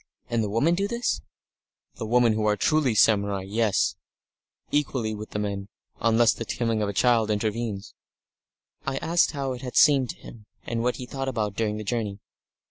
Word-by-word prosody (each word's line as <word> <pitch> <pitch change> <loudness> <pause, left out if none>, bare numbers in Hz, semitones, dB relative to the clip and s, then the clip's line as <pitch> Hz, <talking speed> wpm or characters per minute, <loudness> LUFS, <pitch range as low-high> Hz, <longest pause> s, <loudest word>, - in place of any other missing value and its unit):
"And 115 -1 +1
the 105 - -2
women 115 +11 +2
do 195 +3 0
this?" 235 - -1 0.8
"The 110 - -4
women 120 0 +4
who 110 0 0
are 105 0 +2
truly 140 - +2
samurai 100 -3 +3
yes. 105 +1 +1 0.7
Equally 130 -7 0
with 105 0 -7
the - - -5
men. 100 -1 -3 0.3
Unless 115 0 +4
the - - -5
coming 115 -1 -1
of 100 -1 -2
children 115 -1 +3
intervenes." 105 -1 -3 0.9
I 135 - -2
asked 170 +1 +2
him - - -8
how 135 -1 -1
it 125 - -8
had 125 -2 -7
seemed 140 -5 +5
to - - -5
him, 110 -3 -13 0.2
and 115 -1 -2
what 125 +1 0
he 125 - -6
thought 135 +1 -5
about 105 -5 -2
during 105 -1 -1
the 110 - -5
journey. 105 -2 -2
115 Hz, 185 wpm, -26 LUFS, 105-125 Hz, 0.9 s, seemed